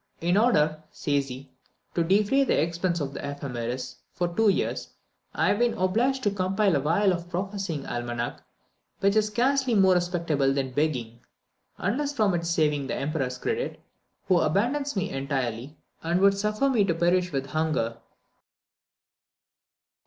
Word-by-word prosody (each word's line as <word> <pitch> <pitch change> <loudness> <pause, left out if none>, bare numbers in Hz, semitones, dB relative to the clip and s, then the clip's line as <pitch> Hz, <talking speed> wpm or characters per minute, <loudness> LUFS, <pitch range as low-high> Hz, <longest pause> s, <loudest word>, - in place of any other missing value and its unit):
"In 175 +2 +1
order," 155 -9 +3
says 140 -1 -1
he, 130 +2 -9 0.4
"to 170 - +1
defray 205 +10 +3
the - - +2
expense 170 +2 0
of 140 -2 -3
the - - -6
Ephemeris 125 -3 -4
for 175 - -1
two 225 -1 +4
years, 195 - -1 0.5
I - - +2
have 205 - +1
been 240 -1 +2
obliged 235 +9 +1
to 205 - +2
compose 195 +1 +1
a 145 - +3
vile 180 +7 +2
prophesying 185 -4 -4
Almanac, 120 0 -4 0.6
which 200 +1 +2
is 215 -1 +3
scarcely 255 +3 +1
more 190 -2 +5
respectable 170 -6 +1
than 135 -2 -1
begging, 125 -5 -1 0.6
unless 280 +9 -1
from 215 -8 +2
its 170 -1 -1
saving 150 -4 +1
the - - -2
Emperor's 135 -3 -2
credit, 460 +2 -3 0.5
who 185 -2 +4
abandons 245 - 0
me 190 - -1
entirely, 135 -1 -3 0.2
and 170 +2 0
would 200 +1 +5
suffer 210 +6 0
me 245 -6 +3
to 170 -4 0
perish 180 +1 +2
with 135 -2 -2
hunger." 155 -8 0
175 Hz, 150 wpm, -26 LUFS, 140-205 Hz, 0.6 s, more